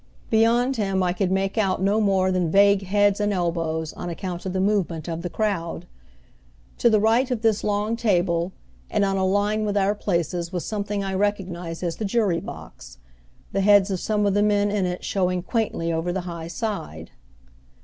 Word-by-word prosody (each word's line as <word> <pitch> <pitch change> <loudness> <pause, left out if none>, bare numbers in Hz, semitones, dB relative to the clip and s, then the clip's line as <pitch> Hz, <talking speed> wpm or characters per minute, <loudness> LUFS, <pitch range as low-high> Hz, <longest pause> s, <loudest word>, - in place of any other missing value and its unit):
Beyond 235 +4 +3
him 195 -3 0
I 175 -1 +1
could 185 0 0
make 195 +3 0
out 195 -3 +1
no 200 +3 +2
more 190 -2 +2
than 180 -3 0
vague 200 +1 +4
heads 205 +1 +3
and 205 0 +1
elbows, 165 -3 -2
on 175 - -6
account 180 +1 -5
of 185 - -3
the 190 - -1
movement 190 -5 0
of 165 -1 -4
the 175 - -4
crowd. 175 -6 -2 0.9
To 235 - +5
the 215 -2 +4
right 230 +5 +3
of 240 -3 -2
this 220 -2 +2
long 210 +2 0
table 180 -6 +1 0.4
and 210 -2 +1
on 195 0 0
a 190 - 0
line 205 +3 +1
with 205 -1 -1
our 200 +1 +2
places 175 -4 -2
was 180 -3 -3
something 205 -1 -3
I 195 0 -3
recognized 185 -4 -2
as 170 -2 -2
the 220 - -3
jury 200 -5 +1
box, - - -10 0.5
the 195 - 0
heads 200 0 +5
of 185 - -1
some 210 +1 0
of 200 - +2
the 205 - +2
men 205 -1 +2
in 200 -3 0
it 180 0 -4
showing 180 -2 0
quaintly 185 -6 -1
over 165 +2 -1
the 190 +1 -2
high 170 -2 -6
side. 160 - -5
195 Hz, 195 wpm, -24 LUFS, 175-210 Hz, 0.9 s, To